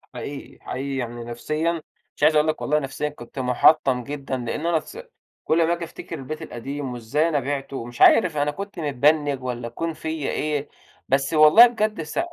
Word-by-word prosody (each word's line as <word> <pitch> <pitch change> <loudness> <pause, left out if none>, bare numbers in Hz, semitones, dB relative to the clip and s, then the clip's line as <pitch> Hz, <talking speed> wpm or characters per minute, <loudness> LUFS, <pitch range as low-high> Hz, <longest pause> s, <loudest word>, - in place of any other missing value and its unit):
حقيقي، 140 0 -8
حقيقي 135 +2 -4
يعني 120 -1 -4
نفسيًا 155 +8 -2 0.3
مش - - -6
عايز 155 +1 +5
أقول 150 +1 +4
لك 155 - -1
والله 150 +1 +1
نفسيًا 135 +1 -3
كنت 135 -2 -10
مُحطّم 125 0 +3
جدًا 140 -1 -4
لإن 125 +6 -4
أنا 170 -1 +2
تس 405 - -12 0.5
كل 165 +2 +2
أمّا 165 +1 +3
آجي 170 0 -4
أفتكر 170 - -8
البيت 155 +4 -6
القديم 135 -1 -5
وإزاي 130 +8 0
أنا 150 -3 +1
بِعتُه؟ 135 0 -4
ومش 120 0 -8
عارف 180 -8 +6
أنا 145 0 +1
كنت 200 +3 -7
متبنّج 145 -1 +1
والّا 120 -2 -4
كون 165 +8 -4
فيّا 160 -2 -4
إيه. 150 -1 -2 0.4
بس 135 +3 +1
والله 155 +10 +8
بجد 215 -6 -2
س 155 - -4
145 Hz, 185 wpm, -23 LUFS, 130-160 Hz, 0.5 s, والله